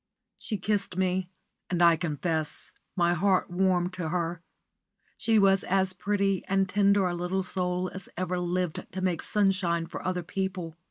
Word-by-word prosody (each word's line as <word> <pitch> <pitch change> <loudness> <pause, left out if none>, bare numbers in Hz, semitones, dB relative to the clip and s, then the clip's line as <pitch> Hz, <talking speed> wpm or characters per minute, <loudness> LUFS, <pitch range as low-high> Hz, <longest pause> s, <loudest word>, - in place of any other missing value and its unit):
She 215 0 -2
kissed 200 -1 -1
me, 185 -1 0 0.4
and, 180 - 0
I 170 -1 +7
confess, 160 -1 -2 0.2
my 175 -1 +3
heart 185 +1 +2
warmed 180 0 +1
to 180 -3 -3
her. 170 0 -2 0.7
She 225 -1 +2
was 195 -2 +5
as 190 0 +1
pretty 195 0 0
and 195 0 +2
tender 200 0 +3
a 175 - -1
little 180 +2 -1
soul 180 0 -1
as 190 0 -6
ever 180 0 -1
lived 180 -1 -2
to 185 - -3
make 180 -3 0
sunshine 185 -5 +1
for - - -7
other 180 -1 -1
people. 185 -2 -3
185 Hz, 160 wpm, -28 LUFS, 175-195 Hz, 0.7 s, I